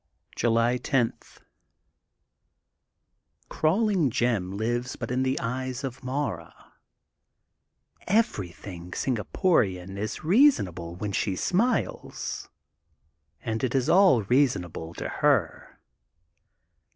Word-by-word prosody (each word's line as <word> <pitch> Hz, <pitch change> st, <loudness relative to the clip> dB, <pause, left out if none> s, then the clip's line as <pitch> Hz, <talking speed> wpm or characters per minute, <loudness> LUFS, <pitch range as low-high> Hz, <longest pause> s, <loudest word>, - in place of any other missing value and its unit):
July 115 Hz, +1 st, +2 dB
10: 125 Hz, -2 st, +1 dB, 1.6 s
— -, -, -46 dB
Crawling 185 Hz, -, +2 dB
Jim 105 Hz, -6 st, 0 dB
lives 120 Hz, +3 st, -2 dB
but -, -, -5 dB
in 125 Hz, +1 st, 0 dB
the 130 Hz, +1 st, 0 dB
eyes 130 Hz, +2 st, -3 dB
of 130 Hz, -2 st, -6 dB
Mara. 125 Hz, -, -3 dB, 1.5 s
Everything 95 Hz, -, -1 dB
Singaporian 100 Hz, -, 0 dB
is 110 Hz, +1 st, -4 dB
reasonable 100 Hz, -, +3 dB
while 100 Hz, +3 st, -4 dB
she 95 Hz, 0 st, -1 dB
smiles, 225 Hz, -, -1 dB, 0.9 s
and 110 Hz, +1 st, -3 dB
it 130 Hz, +1 st, 0 dB
is 135 Hz, +2 st, +1 dB
all 180 Hz, -, +5 dB
rea 130 Hz, +8 st, +4 dB
sonable 85 Hz, -6 st, -6 dB
to -, -, -4 dB
her. 135 Hz, -, 0 dB
120 Hz, 95 wpm, -26 LUFS, 100-145 Hz, 1.6 s, all